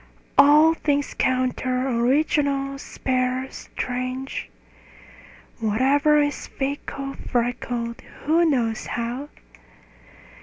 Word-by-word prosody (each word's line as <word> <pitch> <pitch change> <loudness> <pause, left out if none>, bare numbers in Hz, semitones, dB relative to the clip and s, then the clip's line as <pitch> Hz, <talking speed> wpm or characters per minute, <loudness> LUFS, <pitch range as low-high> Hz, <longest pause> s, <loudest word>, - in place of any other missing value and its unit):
All 305 +3 +7
things 285 -3 -1
counter, 255 0 0
original, 275 +2 +1
spare, 255 -1 -1
strange; 255 +1 -4 1.1
Whatever 270 +7 +3
is 290 0 -1
fickle, 275 0 -4
freckled 235 -1 -2 0.2
(who 325 +4 +3
knows 240 -8 0
how?) 245 +5 -3
265 Hz, 75 wpm, -23 LUFS, 250-285 Hz, 1.1 s, All